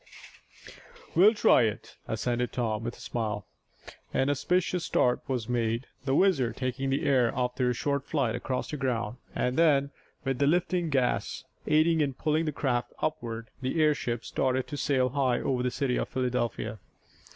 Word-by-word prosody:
"We'll 210 +6 +6
try 210 - +5
it," 110 -2 -2
assented 120 +2 -1
Tom, 110 -3 -1
with 115 +1 -4
a - - -17
smile. 105 -4 -3 0.7
An 135 +2 +2
auspicious 180 +5 0
start 125 -1 +2
was 125 -5 -2
made, 120 0 0 0.2
the 135 0 +1
WHIZZER 140 - +3
taking 130 +2 -2
the 135 +1 0
air 125 -4 +3
after 125 0 0
a - - +1
short 140 +2 -1
flight 140 -7 0
across 125 +1 -3
the 150 - -3
ground, 120 -4 -2 0.2
and 125 +1 0
then, 140 -4 +4 0.3
with 135 -3 -1
the 140 - +3
lifting 175 +1 +1
gas 135 -4 0 0.2
aiding 155 +1 +4
in 140 -3 0
pulling 155 +3 0
the 155 - 0
craft 125 -4 -1
upward, 115 -7 -3
the 130 +5 -1
airship 135 -6 +1
started 130 -1 0
to 145 - -4
sail 130 -3 +1
high 130 -2 +1
over 130 -2 0
the 125 - +1
city 125 0 -1
of - - -2
Philadelphia. 120 -3 -2
130 Hz, 165 wpm, -28 LUFS, 120-145 Hz, 0.7 s, We'll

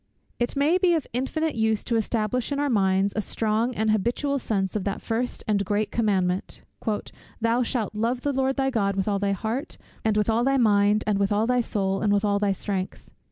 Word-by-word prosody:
It 240 +3 -1
may 300 +6 +3
be 360 -2 +4
of 315 - -1
infinite 300 +5 -1
use 220 -1 +1
to 235 - -1
establish 225 +3 -1
in 280 - -1
our 290 -1 +1
minds 195 -2 +2
a 215 - +1
strong 225 +3 -1
and 220 0 +1
habitual 245 +7 0
sense 195 -5 -1
of 210 - -1
that 200 0 -2
first 240 +2 -2
and 205 -2 +2
great 205 +2 -1
commandment 190 -5 0 0.8
"Thou 230 +2 +2
shalt 230 -3 -1
love 230 +4 -1
the 285 +1 -1
Lord 265 0 +1
thy 270 -1 0
God 200 -5 0
with 195 0 -1
all 200 -1 +1
thy 200 0 +1
heart, 225 - -4 0.3
and 220 -1 +1
with 210 - +2
all 230 +1 +2
thy 270 +1 +2
mind, 210 -3 +3
and 210 -2 +1
with 200 +1 +1
all 210 +2 +2
thy 250 +1 +2
soul, 195 -4 -1
and 210 - +2
with 205 +1 +2
all 200 -1 +2
thy 205 -1 +1
strength." 195 -1 -4
220 Hz, 215 wpm, -25 LUFS, 200-250 Hz, 0.8 s, be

